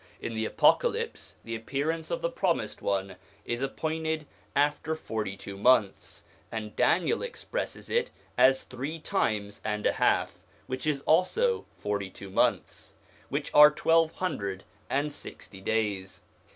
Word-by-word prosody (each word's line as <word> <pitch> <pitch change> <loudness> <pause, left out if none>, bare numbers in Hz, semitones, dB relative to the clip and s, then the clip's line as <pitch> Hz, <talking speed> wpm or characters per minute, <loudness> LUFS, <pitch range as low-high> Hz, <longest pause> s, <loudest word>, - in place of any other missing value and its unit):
In 115 - -4
the 110 0 -1
Apocalypse, - - +2
the 115 - -4
appearance 145 +8 -2
of 170 -1 -3
the 170 - +1
Promised 170 - -1
One 95 -1 -1 0.3
is 120 +1 -2
appointed 160 +3 -2 0.3
after 150 +2 +1
forty 110 -9 -4
two 100 0 -8
months, 105 -1 +2 0.3
and 110 -2 -5
Daniel 170 0 +2
expresses 485 +1 -5
it 475 0 +1 0.3
as 130 0 +5
three 135 +6 -5
times 110 - -1
and 105 -1 -2
a - - +5
half, - - +1 0.3
which 130 +3 -4
is 145 -3 +1
also 430 - +2
forty 100 -2 -2
two 95 0 -11
months; - - 0 0.4
which - - -3
are 150 0 +10
twelve 165 +2 +3
hundred 100 - -3 0.3
and 145 +2 0
sixty 95 -8 -10
days. 100 -3 -1
135 Hz, 140 wpm, -29 LUFS, 105-160 Hz, 0.4 s, are